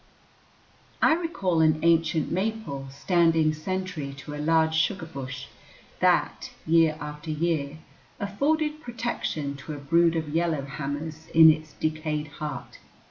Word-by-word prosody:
I - - +5
recall 195 - 0
an 155 -1 +4
ancient 165 -2 +2
maple 190 -8 -2
standing 160 +2 +2
sentry 160 -3 -4
to 140 +2 -9
a 150 - -4
large 160 +1 +3
sugar 160 +2 +1
bush, 135 -5 -7 0.5
that, - - +2 0.2
year 160 -1 +4
after 150 +1 -7
year, 155 -2 -1 0.4
afforded 300 +9 0
protection 230 - -3
to 140 +3 -7
a - - -6
brood 165 +4 +3
of 160 -2 -2
yellow 160 -2 0
hammers 150 +3 -5
in 160 -1 +10
its 155 -1 -5
decayed 155 -1 -2
heart. 150 -3 -7
160 Hz, 130 wpm, -26 LUFS, 150-170 Hz, 0.5 s, in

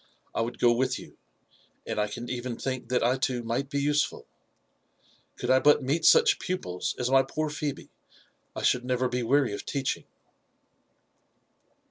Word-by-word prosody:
I - - 0
would 120 +2 -3
go 120 -1 +4
with 125 +1 0
you, - - -12 0.7
and - - -3
I 105 - 0
can 120 +3 -7
even 125 -1 -4
think 130 -3 -4
that 125 -2 +1
I 125 +3 +2
too 125 -2 -1
might 120 +4 -2
be 140 0 -1
usefuL 145 +1 0 1.1
Could 125 - -1
I 130 - +6
but 145 0 +4
meet 150 +5 0
such 450 -3 +6
pupils 90 - -3
as 125 +1 -1
my 135 0 +6
poor 155 +3 -3
Phebe, 150 -1 -5 0.6
I - - -5
should 125 - +2
never 125 0 0
be 125 0 -2
weary 135 -1 +2
of - - -5
teaching." 140 -2 -2
130 Hz, 165 wpm, -27 LUFS, 120-140 Hz, 1.1 s, I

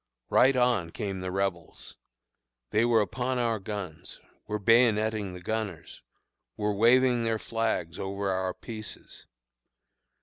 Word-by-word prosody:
Right 130 +1 +5
on 125 -9 +2
came 95 +2 -4
the 90 0 -4
Rebels. 95 -4 -3 0.8
They 110 - +3
were 115 -2 +4
upon 125 +5 -2
our 115 -3 0
guns 95 -5 -7 0.3
were 105 0 -1
bayoneting 110 -2 +3
the 90 - -9
gunners 105 -3 -4 0.6
were 105 0 0
waving 120 +3 +4
their 115 -1 0
flags 110 -7 -2
over 100 0 -2
our 95 -1 -1
pieces. 110 -2 -9
105 Hz, 125 wpm, -28 LUFS, 95-115 Hz, 0.8 s, Right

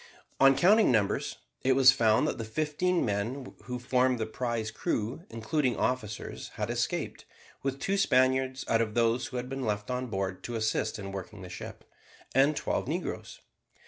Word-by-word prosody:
On 135 0 +7
counting 210 0 +5
numbers 110 -4 +1 0.2
it 130 - +3
was 135 0 +8
found 110 -5 +3
that - - -2
the - - -2
fifteen 155 +9 0
men 115 +6 -3
who 125 0 -4
formed 125 0 +2
the 110 - -1
prize 115 -1 -3
crew 115 - -2
including 120 +3 0
officers, 110 -4 -2
had - - -2
escaped, - - -2 0.4
with 135 0 -2
two 195 +6 0
Spaniards 130 -4 +2
out 115 0 +3
of 110 -1 -2
those 120 +1 +2
who 125 0 -5
had 125 0 -3
been 135 0 -4
left 105 +1 -2
on 125 0 -2
board 95 -3 -3
to 120 - -4
assist 110 0 0
in 100 -2 -6
working 100 +1 -7
the 90 - -8
ship, 90 - -8 0.5
and 140 +3 +4
twelve - - -1
negroes. - - -4
125 Hz, 175 wpm, -29 LUFS, 110-135 Hz, 0.5 s, was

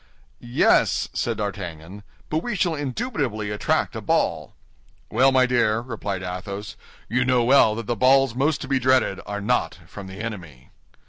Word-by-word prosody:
"Yes," 120 +1 +2
said - - -2
D'Artagnan; 95 -2 -6 0.3
"but 155 - +1
we 235 +6 -4
shall 175 -3 +1
indubitably 140 - -3
attract 105 - 0
a - - -4
ball." - - -1 0.6
"Well, 130 +4 +4
my 130 -1 +4
dear," 120 -3 +2
replied 105 -6 -5
Athos, 95 +2 -6 0.3
"you 125 +4 +1
know 125 -1 +2
well 120 -3 +5
that 115 0 -5
the 120 - -1
balls 135 +1 +4
most 135 +4 0
to - - -5
be 135 -1 +1
dreaded 130 -6 +2
are 105 0 -4
not 105 -7 0
from 95 +3 -10
the 95 +1 -10
enemy." 90 - -8
115 Hz, 160 wpm, -23 LUFS, 100-130 Hz, 0.6 s, well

